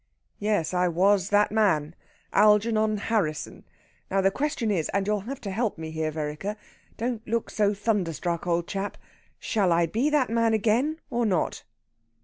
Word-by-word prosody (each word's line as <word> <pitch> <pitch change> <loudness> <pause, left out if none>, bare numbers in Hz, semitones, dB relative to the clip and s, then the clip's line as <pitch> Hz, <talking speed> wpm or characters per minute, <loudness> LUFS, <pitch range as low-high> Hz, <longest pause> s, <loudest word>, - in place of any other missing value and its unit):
"Yes, 205 -6 0
I 180 0 +2
was 190 +2 +2
that 205 0 +3
man 170 -8 +2 0.4
Algernon 215 +1 +4
Harrisson. 200 -8 -2 0.4
Now, 195 - +1
the 195 0 +3
question 265 -4 -1
is 170 -6 0
and 200 -1 +1
you'll 210 0 +1
have 275 - -5
to 200 -4 -5
help 220 0 -1
me 160 -1 -6
here, 160 0 -2
Vereker. 155 +6 -4 0.4
Don't 235 -1 -2
look 230 +1 -1
so 205 -1 +1
thunderstruck, 180 -5 -1
old 170 0 +1
chap 195 +2 -4 0.4
Shall 200 -6 0
I 170 0 +3
be 230 - 0
that 290 -6 +1
man 230 -1 +2
again 235 +9 +1
or 240 0 0
not?" 180 -6 -1
205 Hz, 160 wpm, -26 LUFS, 175-225 Hz, 0.4 s, Algernon